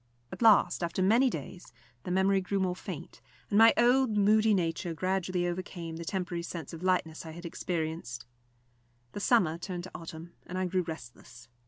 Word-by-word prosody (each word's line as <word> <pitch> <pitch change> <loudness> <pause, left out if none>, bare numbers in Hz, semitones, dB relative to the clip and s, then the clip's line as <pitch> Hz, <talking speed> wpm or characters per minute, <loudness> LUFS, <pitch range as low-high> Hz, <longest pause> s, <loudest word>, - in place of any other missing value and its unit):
At - - -8
last, 205 -6 +5
after 170 +2 -1
many 235 +7 +4
days, 175 - -7 0.3
the - - -4
memory 190 +1 +3
grew 195 +2 -1
more 185 -1 0
faint, 175 -4 -8 0.3
and 205 - +3
my 225 0 +9
old 245 -2 +4
moody 215 +2 +4
nature 170 -1 -2
gradually 185 +1 -1
overcame 175 -2 -5
the 170 - -6
temporary 180 -1 -3
sense 170 -3 -7
of 165 - -8
lightness 180 -4 0
I 165 - -8
had 170 +2 -10
experienced. 160 -8 -4 0.9
The - - -6
summer 185 -8 +2
turned 175 -1 -5
to 185 - -9
autumn, 165 0 -9
and 185 - -5
I 185 - 0
grew 185 +1 0
restless. 125 -7 -10
180 Hz, 175 wpm, -30 LUFS, 165-195 Hz, 0.9 s, my